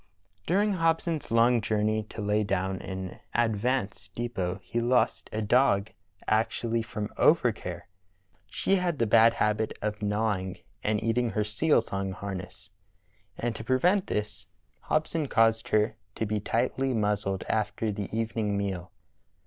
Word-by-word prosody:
During 205 +4 +2
Hobson's 165 -2 0
long 115 +1 +4
journey 110 0 +1
to 105 - -6
lay 105 +1 +2
down 95 -1 -1
an 95 -1 -6 0.2
ad 115 -2 +2
vance 105 -3 -1
depot 100 -3 -3
he 120 - -2
lost 125 +1 +1
a 110 0 -2
dog 110 -2 +3 0.4
actually 115 +1 +1
from 105 -1 -4
overcare. 110 - +2 0.6
She 195 - +1
had 175 -4 0
the 115 - +2
bad 115 +2 +6
habit 110 -1 0
of 105 0 -3
gnawing 105 -3 -1 0.3
and 105 0 0
eating 115 +1 +1
her 105 -1 0
seal 115 +8 +2
thong 95 -3 -3
harness, 95 0 -7 0.7
and 120 -1 -2
to - - -6
prevent 175 - +2
this 105 0 -3 0.4
Hobson 155 0 0
caused 115 -2 +3
her 110 +1 +2 0.2
to 110 - -1
be 105 0 -1
tightly 125 +5 0
muzzled 105 -3 0
after 110 0 0
the 100 -1 -4
evening 110 -2 -1
meal. 95 -3 -3
110 Hz, 140 wpm, -28 LUFS, 100-120 Hz, 0.7 s, bad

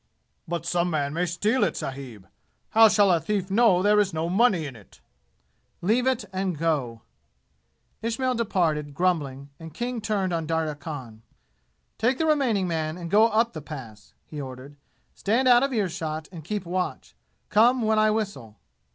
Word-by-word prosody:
"But 170 -1 -3
some 175 0 0
man 145 -3 -1
may 175 +2 0
steal 210 +9 +1
it, - - 0
sahib. 130 -8 -7 0.4
How 225 0 +7
shall 205 -2 +4
a 170 - +3
thief 190 +3 -2
know 195 -4 +4
there 210 +1 +4
is 200 -4 +1
no 160 +2 -1
money 190 -4 +3
in 135 -3 -7
it?" 105 -4 -17 0.8
"Leave 230 +8 +1
it 255 -5 0
and 190 -3 -2
go!" 140 -8 -1 1.0
Ismail 245 +3 -1
departed, 165 - -1
grumbling, 145 -6 -1
and 160 -2 -10
King 240 +1 -3
turned 200 -4 -1
on 165 -2 -2
Darya 160 -1 -1
Khan. 140 -7 -8 0.8
"Take 245 +4 +2
the 320 - 0
remaining 255 -11 +2
man, 160 -1 -2
and 170 -1 -7
go 215 +2 +6
up 230 +1 +1
the 155 - -6
Pass!" 130 -8 -10
he 150 -2 -7
ordered. 130 +1 -9 0.4
"Stand 235 +6 +1
out 245 -1 +7
of 275 +1 0
ear 215 -6 +1
shot 155 -2 -5
and 165 -4 -9
keep 205 +3 -4
watch. 180 +1 -3 0.4
Come 240 +3 +4
when 220 0 +2
I 215 0 +4
whistle!" 200 - -3
180 Hz, 170 wpm, -25 LUFS, 155-215 Hz, 1.0 s, How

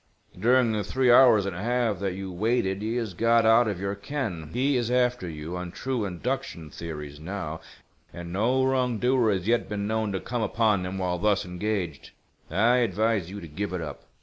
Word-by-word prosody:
During 120 +2 +4
the 105 -1 -1
three 125 +5 +2
hours 120 -5 +7
and 100 -3 -3
a 90 - -5
half 120 -3 0
that 95 -2 -2
you 95 0 -6
waited 100 0 0
he 110 +2 -2
has 115 -5 -2
got 115 +4 +3
out 115 +1 +5
of 100 -4 -2
your 100 +1 -2
ken. 100 - -4
He 135 - +1
is 120 -2 0
after 125 -6 +1
you 80 +2 -6
on 90 -1 -5
true 130 -1 -2
induction 85 -3 -4
theories 75 -4 -7
now, 80 -2 -5 0.5
and 85 0 -8
no 125 +7 +2
wrongdoer 125 -2 +2
has 95 -1 -2
yet 120 +1 +1
been 100 -1 -2
known 110 0 -1
to 95 - -1
come 120 +3 -3
upon 110 -4 +1
him 95 +1 -5
while 90 -2 -1
thus 105 -2 +2
engaged. 90 -4 -3 0.4
I 115 +9 +3
advise 110 -4 +1
you 100 +2 -7
to 85 - -8
give 95 +6 -4
it 90 - -2
up." 75 -3 -7
105 Hz, 200 wpm, -26 LUFS, 90-120 Hz, 0.5 s, hours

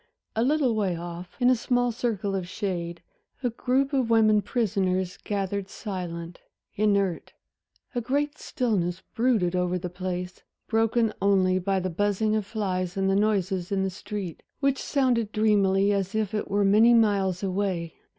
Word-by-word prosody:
A 220 - +1
little 275 -2 +2
way 200 -5 0
off, 175 +1 -8
in 250 0 +5
a - - +5
small 245 +1 +1
circle 220 -4 -2
of 185 -2 -2
shade, 175 -3 -4 0.4
a 245 - +1
group 265 +4 0
of 260 -4 +1
women 215 -2 +5
prisoners 190 -5 0
gathered 200 -1 -2
silent, 175 -5 -6 0.3
inert. 200 -4 0 0.6
A 245 - -1
great 285 +5 -1
stillness 190 -8 -1
brooded 225 -7 +2
over 180 0 0
the 180 0 -5
place, 180 0 -5 0.3
broken 225 0 +2
only 190 -2 +3
by 190 +1 0
the 185 0 -3
buzzing 205 +4 +1
of 215 -2 -1
flies 185 -4 -2
and 195 0 +2
the - - +2
noises 195 -3 0
in 195 -1 +1
the 190 - -1
street, 190 -2 -6 0.2
which 275 -1 +1
sounded 245 -6 +1
dreamily 200 -2 +3
as 195 0 -2
if 215 -2 -1
it 210 - -2
were 200 0 +2
many 220 +4 +6
miles 200 -4 +2
away. 185 -4 -1
200 Hz, 160 wpm, -26 LUFS, 185-225 Hz, 0.6 s, many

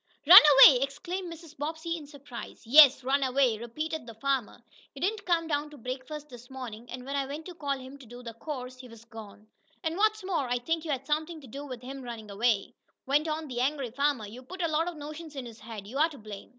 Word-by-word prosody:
"Run 360 +6 +12 0.2
away!" 255 -3 +7
exclaimed 345 +6 -4
Mrs. 330 -2 -12
Bobbsey, 320 +2 -4
in 305 -3 -9
surprise. 280 -4 -10
"Yes, 275 +1 +8
run 275 +2 +1
away," 260 -4 +2
repeated 305 +5 -5
the 230 - -10
farmer. 265 -1 -2 0.4
"He - - -9
didn't 400 +5 -2
come 335 -2 +2
down 295 -1 -1
to 295 - -13
breakfast 260 +5 -6
this 245 -1 -13
mornin', 245 -3 -8
and 255 0 -8
when 275 +1 -4
I 275 -1 -1
went 295 +3 -7
to 360 - -8
call 285 -4 -2
him 265 +2 -11
to 260 - -14
do 245 +2 -11
the 230 -2 -8
chores, 255 -4 -6
he 255 - -10
was 230 -1 -15
gone. 215 -2 -12 0.4
And, 325 +1 -2
what's 430 0 +2
more, 335 -9 -1
I 245 - +1
think 325 +6 -2
you - - -6
had 270 -2 -2
somethin' 310 +3 -2
to 270 - -13
do 280 +5 -8
with 250 -2 -8
him 270 +2 -7
runnin' 230 -4 -8
away," 210 -1 0 0.3
went 290 +4 +2
on 310 0 -3
the 245 -2 -3
angry 270 -2 -1
farmer. 280 -3 0
"You 225 +5 -10
put 365 +8 -7
a - - +2
lot 320 +2 0
o' 355 - -3
notions 305 0 -9
in 265 -2 -5
his 230 -2 -11
head. 220 -3 -9
You're 280 +9 +1
to 295 - -12
blame!" 210 -4 -10
275 Hz, 240 wpm, -28 LUFS, 245-310 Hz, 0.4 s, Run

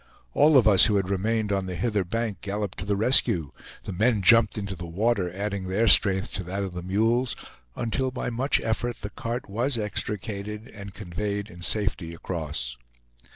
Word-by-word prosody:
All 150 -1 +5
of 120 - +5
us 100 -4 +7
who 105 - +1
had 95 -1 0
remained 105 +2 0
on 95 -1 -1
the 90 - -4
hither 105 -1 0
bank 105 0 -3
galloped 100 -1 -4
to 95 - -4
the 100 0 0
rescue; 100 - +3 0.3
the 100 - -5
men 110 +2 +2
jumped 115 +2 +6
into 100 -2 -4
the 85 -1 -7
water, 95 +1 0
adding 100 0 -4
their 105 +5 +1
strength 95 -3 +4
to 95 - -3
that 95 +3 -3
of 95 -2 -5
the 90 - -5
mules, 115 +7 +1 0.4
until 130 +3 -1
by 125 -1 -4
much 130 +5 +1
effort 115 +1 -2
the 105 - -6
cart 120 +1 -4
was 120 +6 -1
extricated, 105 +1 -4
and 100 -1 -10
conveyed 105 +1 -4
in 85 - -12
safety 95 -4 -1
across. 75 -8 -4
100 Hz, 185 wpm, -26 LUFS, 95-115 Hz, 0.4 s, us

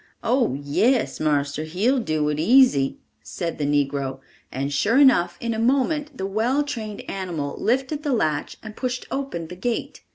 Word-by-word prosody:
"Oh, 250 - +2
yes, 180 - +1
marster, 145 -1 0
he'll 200 - +1
do 155 -8 -1
it 150 0 -2
easy," 195 - +4 0.2
said 170 -4 -5
the 145 - 0
negro; 140 -2 0 0.3
and 140 +2 -3
sure 210 - +2
enough, 260 -11 +5
in 235 -1 -2
a 220 - -3
moment 280 +4 +1
the 190 - -3
well 230 +9 +1
trained 220 -7 -5
animal 170 -7 -4
lifted 265 +6 0
the 295 -2 -2
latch 155 - -1
and 215 -1 -9
pushed 255 -1 -3
open 270 -12 -3
the 180 - -9
gate! 230 +6 -3
205 Hz, 165 wpm, -23 LUFS, -, 0.3 s, enough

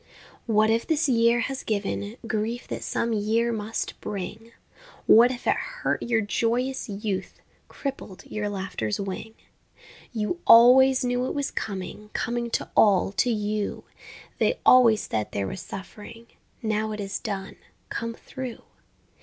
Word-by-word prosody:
What 215 -1 +3
if 230 +1 0
this 320 -1 +2
year 235 -1 +3
has 270 +3 -3
given 205 +1 -3
Grief 220 +2 -2
that - - -4
some 230 0 -1
year 225 +3 +1
must 220 0 -4
bring, 210 +3 -6 0.5
What 235 +3 +7
if 250 -1 -6
it - - +3
hurt - - -3
your 235 -2 +1
joyous 235 +5 -1
youth, 200 -2 -4 0.3
Crippled 265 -9 -6
your 210 -1 -3
laughter's 190 - -3
wing? 200 +3 -5 0.8
You 225 +9 -2
always 255 +3 +7
knew 245 +1 0
it - - -4
was 285 -1 -2
coming, 205 +1 -5
Coming 240 0 -2
to - - -1
all, 195 -2 +4
to 245 - +1
you, 210 -2 -2 0.6
They - - +2
always 235 -4 +6
said 110 -1 -3
there 100 - -1
was 95 - -5
suffering 210 +4 -9 0.4
Now 215 0 -1
it 210 - -6
is 195 -1 -3
done, 195 -1 -5 0.3
come 230 0 -3
through. 260 -2 -8
225 Hz, 145 wpm, -25 LUFS, 205-240 Hz, 0.8 s, What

